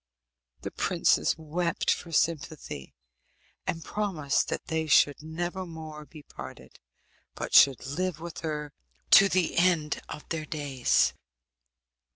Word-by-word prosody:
The - - -5
princess - - +2
wept 165 +2 -1
for 170 - -8
sympathy, 155 - -2 0.7
and 165 -1 -2
promised 180 -10 -1
that - - -3
they 160 -1 -2
should 145 -1 +4
never 175 +4 -4
more 160 -3 -9
be 150 -1 -13
parted, - - -11 0.6
but - - -5
should 135 -2 +6
live 165 +4 -2
with 170 0 -7
her 150 -2 -4 0.4
to 195 0 +8
the 185 -2 +1
end 170 -4 +2
of 150 - -8
their 160 -2 -3
days. 140 -5 +1
160 Hz, 125 wpm, -28 LUFS, 150-170 Hz, 0.7 s, to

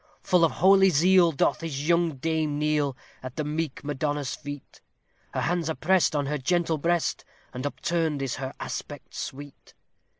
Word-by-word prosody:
Full 180 -2 +3
of 165 - +3
holy 190 +2 +5
zeal 175 +2 +5
doth 145 +1 +1
his 150 -3 -4
young 170 -2 +2
dame 155 +1 -1
kneel 150 -3 0 0.2
at 130 -1 -8
the 155 - -2
meek 150 -1 -3
Madonna's 145 -1 -2
feet, 145 -2 -9 0.5
Her - - 0
hands 170 -1 0
are 160 - -1
pressed 180 -1 +2
on 145 -1 +1
her 150 +1 -2
gentle 165 +2 +1
breast, 170 +2 0 0.3
and 130 +2 -3
upturned 160 -2 -1
is 130 -3 -3
her 135 -1 -4
aspect - - -6
sweet. 145 +1 -8
155 Hz, 165 wpm, -26 LUFS, 145-170 Hz, 0.5 s, holy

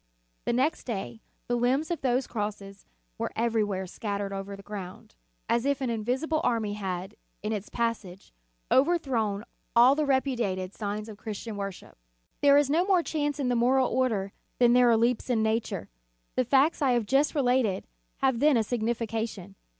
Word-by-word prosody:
The - - +1
next 265 +6 0
day 195 - -5 0.3
the 245 - +1
limbs 260 +7 +1
of 335 - -2
those 255 0 +1
crosses 205 -2 -5 0.3
were - - -2
everywhere 215 -4 0
scattered 200 +1 -4
over 195 0 -5
the 195 - -12
ground, 195 -3 -8 0.3
as 235 - +1
if 280 0 +1
an 260 -3 -1
invisible 255 +8 -1
army 225 -4 0
had, 190 -1 -4 0.3
in 215 +1 -1
its 210 -1 -4
passage, 220 -6 -3 0.4
overthrown 260 -9 +2 0.3
all 245 +3 +7
the 300 0 0
repudiated 235 -9 0
signs 210 0 -4
of 215 -2 -9
Christian 215 +1 -6
worship 195 - -7 0.4
There 285 0 +6
is 290 -1 +4
no 315 +5 +2
more 370 -3 +3
chance 295 -2 -2
in 265 -3 0
the 245 - +2
moral 255 +2 +3
order 220 -7 0 0.3
than 240 -1 +5
there 250 -1 +6
are 230 - +5
leaps 235 +2 +1
in 225 -3 +2
nature. 220 +1 -1 0.5
The 255 - +2
facts 275 +6 +3
I 265 -3 +3
have 240 -3 +1
just 275 +8 +2
related, 250 -8 +1 0.4
have 265 -3 +3
then 295 -2 +5
a - - +3
signifi 230 0 -1
cation. 220 -4 -4
235 Hz, 175 wpm, -28 LUFS, 205-265 Hz, 0.5 s, all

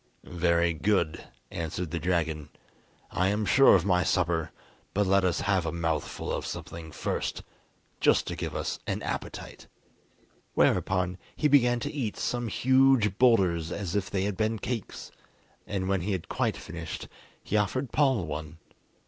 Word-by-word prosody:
"Very 85 -1 +1
good," 85 -1 0 0.3
answered 85 +1 -4
the 85 - -2
dragon. 80 -3 -1 0.6
"I 90 - +1
am 105 +2 0
sure 135 +3 +7
of 90 -2 +2
my 90 -2 +3
supper, 85 -4 +1 0.5
but 105 +1 +3
let 95 0 +3
us 90 -2 +1
have 95 -3 +1
a 80 - -2
mouthful 80 -2 -2
of - - -2
something 80 -1 -7
first, - - -3 0.6
just - - +4
to - - -4
give - - -4
us - - -2
an - - -2
appetite." - - -6 0.9
Whereupon 90 -1 +2 0.2
he 150 - +2
began 125 -4 +4
to 145 +4 -3
eat 125 -8 -3
some 120 -1 -1
huge 130 -3 +3
boulders 90 -10 +3
as 95 -1 -3
if 100 -2 0
they 95 -2 -1
had 100 0 -1
been 110 +1 0
cakes, 115 -1 -5 0.6
and 95 -2 -2
when 95 -2 +1
he 100 +4 -1
had 90 -3 -4
quite - - -1
finished, 85 0 -7 0.4
he - - -3
offered 110 +5 0
Paul 130 - +2
one. 75 +1 -6
95 Hz, 155 wpm, -28 LUFS, 85-110 Hz, 0.9 s, sure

